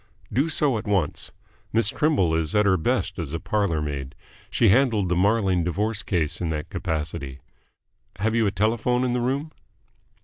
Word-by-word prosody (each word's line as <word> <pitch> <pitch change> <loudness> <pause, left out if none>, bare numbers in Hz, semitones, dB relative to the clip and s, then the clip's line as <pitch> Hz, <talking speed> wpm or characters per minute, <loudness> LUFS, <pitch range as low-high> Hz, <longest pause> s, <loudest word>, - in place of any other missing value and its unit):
"Do 140 +6 +2
so 145 -6 +1
at 110 - -9
once. 95 -7 -1 0.4
Miss 110 -1 +3
Trimble 145 - +2
is 80 +4 -1
at 105 0 +4
her 95 -2 +4
best 80 - -1
as 80 -3 -4
a 80 - -2
parlour 95 -8 0
maid. 70 -3 -5 0.3
She 115 - +3
handled 110 -4 +3
the 90 - +1
Marling 95 -2 +2
divorce 105 +5 -1
case 85 -6 -1
in 85 - -1
that 75 -1 -4
capacity. 75 -4 -4 0.8
Have 110 +3 0
you 115 -2 +2
a - - +1
telephone 115 +4 +1
in 125 -1 0
the 125 - 0
room?" 140 +5 -1
100 Hz, 175 wpm, -24 LUFS, 80-115 Hz, 0.8 s, at